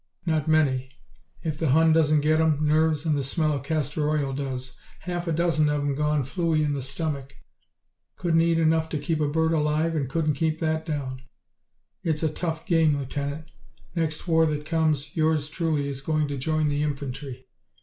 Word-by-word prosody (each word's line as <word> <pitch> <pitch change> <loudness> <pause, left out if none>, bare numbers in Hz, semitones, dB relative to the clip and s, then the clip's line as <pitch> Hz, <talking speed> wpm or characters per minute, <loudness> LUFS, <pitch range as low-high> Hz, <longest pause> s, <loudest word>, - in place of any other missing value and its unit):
"Not 160 -2 0
many. 135 -5 +2 0.5
If 155 -2 -3
the 160 - +1
Hun 160 +4 +5
doesn't 155 -2 +4
get 155 +1 +3
'em, 155 -2 +2
nerves 155 0 +2
and 155 -2 +2
the 140 - 0
smell 155 +3 0
of 140 - -2
castor 150 0 -1
oil 145 -3 0
does. 130 -2 -4 0.3
Half 175 -1 -4
a - - 0
dozen 155 -2 +2
of 150 0 0
'em 145 -1 0
gone 150 0 +1
flooey 160 +2 0
in 145 - 0
the 140 - -2
stomach. 140 0 -4 0.8
Couldn't 165 -2 +2
eat 165 0 +2
enough 160 0 +2
to 155 - -2
keep 155 +2 -1
a 150 - +2
bird 160 +2 +1
alive 155 +1 +1
and 140 -4 -1
couldn't 155 +1 +1
keep 155 +2 0
that 160 0 -1
down. 135 -4 -3 0.8
It's 160 -1 -1
a 155 -1 0
tough 160 -1 -3
game, 160 -5 +3
Lieutenant. 140 +3 -4 0.4
Next 160 -1 -2
war 160 -1 +4
that 150 -1 -2
comes 155 -3 0
yours 155 -2 +1
truly 155 -3 -1
is 135 -1 -5
going 155 +1 0
to 140 - -3
join 155 +3 0
the 145 0 0
infantry." 140 -3 -4
155 Hz, 190 wpm, -25 LUFS, 145-160 Hz, 0.8 s, Hun